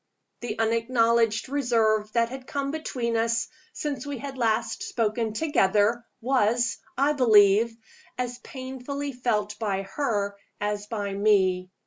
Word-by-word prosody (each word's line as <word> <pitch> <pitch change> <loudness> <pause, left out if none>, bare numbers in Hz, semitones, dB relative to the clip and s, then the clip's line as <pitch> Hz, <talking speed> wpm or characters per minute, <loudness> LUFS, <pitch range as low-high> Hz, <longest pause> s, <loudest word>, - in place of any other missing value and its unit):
The 230 -3 -5
unacknowledged 230 0 +2
reserve 225 -6 +1
that 230 -1 +2
had 260 0 -8
come 280 -1 -2
between 250 -7 -2
us 230 +1 +1 0.3
since 290 -3 -3
we 285 -1 -5
had 275 +2 -6
last 225 -2 0
spoken 225 0 -1
together, 220 -4 +2 0.2
was, 240 -1 +1 0.2
I 280 +3 +3
believe, 225 -3 +5 0.4
as 245 0 -3
painfully 265 +2 -6
felt 220 -5 -1
by 195 -3 -1
her 200 -2 -2 0.2
as 205 0 -2
by 205 -3 -3
me. 190 -3 +2
230 Hz, 125 wpm, -26 LUFS, 210-255 Hz, 0.4 s, believe